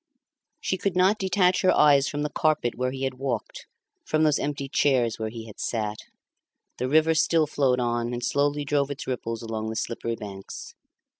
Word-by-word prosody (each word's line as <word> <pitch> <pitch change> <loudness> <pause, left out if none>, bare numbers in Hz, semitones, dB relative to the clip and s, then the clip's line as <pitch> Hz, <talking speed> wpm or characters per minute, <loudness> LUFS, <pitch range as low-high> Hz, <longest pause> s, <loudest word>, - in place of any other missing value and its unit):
She 185 - -2
could 195 -1 -1
not 190 +4 +3
detach 185 -1 +2
her 185 - +4
eyes 140 -2 +5
from 145 0 -2
the 150 - -2
carpet 155 -6 +1
where 130 +1 -1
he 135 +1 -5
had 130 -1 -3
walked, 130 -5 -4 0.4
from 155 0 +1
those 150 -2 +3
empty 140 -1 -3
chairs 130 -5 +2
where 110 0 -2
he 115 0 -8
had 110 - -12
sat. 110 -2 -2 0.8
The 125 - -1
river 155 +2 +4
still 160 0 +3
flowed 135 -4 +1
on, 120 -1 -1
and 120 0 -4
slowly 145 +1 +1
drove 140 -1 +1
its 140 0 -5
ripples 115 -3 -4
along 110 -1 -3
the 110 - -4
slippery 115 +1 -3
banks. 100 -3 -9
135 Hz, 190 wpm, -26 LUFS, 115-150 Hz, 0.8 s, eyes